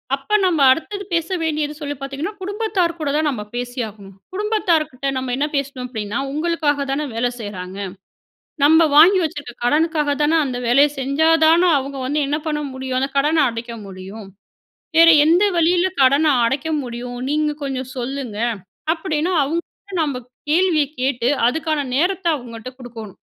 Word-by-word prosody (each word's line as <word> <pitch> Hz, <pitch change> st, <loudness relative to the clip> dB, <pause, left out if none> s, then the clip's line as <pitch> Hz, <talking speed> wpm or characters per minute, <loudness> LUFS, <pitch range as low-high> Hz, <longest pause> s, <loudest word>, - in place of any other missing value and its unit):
அப்ப 280 Hz, +10 st, 0 dB
நம்ப 335 Hz, -5 st, +2 dB
அடுத்தது 395 Hz, +8 st, -2 dB
பேச 335 Hz, -1 st, +1 dB, 0.2 s
வேண்டியது 300 Hz, -2 st, -1 dB
சொல்லி 290 Hz, -1 st, -4 dB
பார்த்தீங்கன்னா, 275 Hz, +8 st, -5 dB
குடும்பத்தார் 395 Hz, -3 st, -1 dB
கூட 305 Hz, -2 st, -2 dB
தான் 310 Hz, 0 st, +1 dB
நம்ம 250 Hz, -7 st, -3 dB
பேசி 245 Hz, +1 st, -4 dB
ஆகணும். 200 Hz, -2 st, -13 dB, 0.2 s
குடும்பத்தார்க்கிட்ட 335 Hz, -, 0 dB
நம்ம 260 Hz, -1 st, -3 dB
என்ன 295 Hz, -, 0 dB
பேசணும் 275 Hz, -2 st, -3 dB
அப்படீன்னா, 220 Hz, -1 st, -4 dB
"உங்களுக்காக 300 Hz, -2 st, 0 dB
தான 275 Hz, +2 st, -1 dB
வேல 235 Hz, +2 st, +1 dB
செய்றாங்க, 190 Hz, -3 st, -7 dB, 0.9 s
நம்ம 320 Hz, +2 st, +6 dB
வாங்கி 375 Hz, +5 st, +8 dB
வச்சுருக்க 290 Hz, -5 st, -5 dB
கடனுக்காக 300 Hz, +2 st, +2 dB
தான, 295 Hz, +2 st, +2 dB
அந்த 255 Hz, -2 st, -4 dB
வேலைய 275 Hz, +5 st, +5 dB
செஞ்சா 275 Hz, +4 st, +1 dB, 0.2 s
தான 330 Hz, +3 st, +5 dB, 0.2 s
அவங்க 275 Hz, +1 st, -5 dB
வந்து 295 Hz, +3 st, 0 dB
என்ன 295 Hz, +2 st, 0 dB
பண்ண 300 Hz, -1 st, -1 dB
முடியும்? 260 Hz, -1 st, -3 dB
அந்த 270 Hz, +1 st, -1 dB
கடன 305 Hz, +3 st, +3 dB
அடைக்க 230 Hz, 0 st, -6 dB
முடியும். 195 Hz, +2 st, -9 dB, 0.7 s
வேற 330 Hz, 0 st, +8 dB, 0.2 s
எந்த 345 Hz, +5 st, +4 dB
வழியில 345 Hz, +2 st, +3 dB, 0.2 s
கடனை 280 Hz, +4 st, +4 dB, 0.2 s
அடைக்க 275 Hz, +6 st, -1 dB
முடியும்? 245 Hz, 0 st, -6 dB
நீங்க 300 Hz, 0 st, +1 dB
கொஞ்சம் 260 Hz, -2 st, -4 dB
சொல்லுங்க." 250 Hz, -3 st, -4 dB, 0.6 s
அப்படீன்னா 320 Hz, +1 st, -2 dB
அவங்க 325 Hz, +5 st, -1 dB
கிட்ட, 400 Hz, -2 st, -11 dB
நம்ம 285 Hz, -4 st, -1 dB, 0.3 s
கேள்விய 330 Hz, -2 st, +3 dB, 0.2 s
கேட்டு 250 Hz, -2 st, 0 dB, 0.2 s
அதுக்கான 310 Hz, +3 st, -1 dB, 0.2 s
நேரத்தை 355 Hz, +3 st, +1 dB
அவங்கட்ட 240 Hz, -2 st, -9 dB
குடுக்கோணும். 225 Hz, -5 st, -9 dB
290 Hz, 150 wpm, -20 LUFS, 250-320 Hz, 0.9 s, வாங்கி